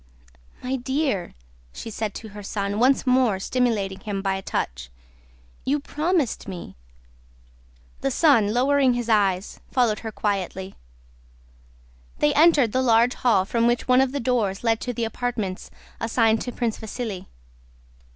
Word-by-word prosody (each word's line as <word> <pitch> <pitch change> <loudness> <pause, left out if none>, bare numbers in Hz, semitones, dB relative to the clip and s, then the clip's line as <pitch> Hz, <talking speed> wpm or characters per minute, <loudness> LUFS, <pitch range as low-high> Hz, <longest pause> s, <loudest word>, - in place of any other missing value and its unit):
"My 260 +1 -1
dear," 265 - -2 0.4
she 225 - -7
said 215 -1 -4
to 220 - -8
her 205 0 -9
son, 200 0 -3
once 260 +4 +3
more 250 -6 +3
stimulating 205 -4 0
him 200 -2 -4
by 195 -1 +1
a 190 - -3
touch, - - -3 0.7
"you 290 +3 +1
promised 305 -1 -1
me!" 180 - -8 1.2
The 275 - 0
son, 255 -7 +4
lowering 260 +1 +3
his 240 -1 -3
eyes, 195 -3 +1
followed 240 -5 +2
her 220 - -6
quietly. 195 -2 -3 1.4
They 150 - +2
entered 295 -7 +5
the 260 - +1
large 235 0 +4
hall, 215 -7 +2
from 230 +3 +1
which 240 0 0
one 255 +1 +5
of 265 -1 +1
the 285 - -2
doors 230 -6 0
led 225 -1 +1
to 250 - -2
the 235 -1 -3
apartments 225 -5 -3 0.3
assigned 225 -1 +2
to 245 - -4
Prince 235 -2 -2
Vasíli. 215 -4 -5
230 Hz, 145 wpm, -24 LUFS, 200-255 Hz, 1.4 s, entered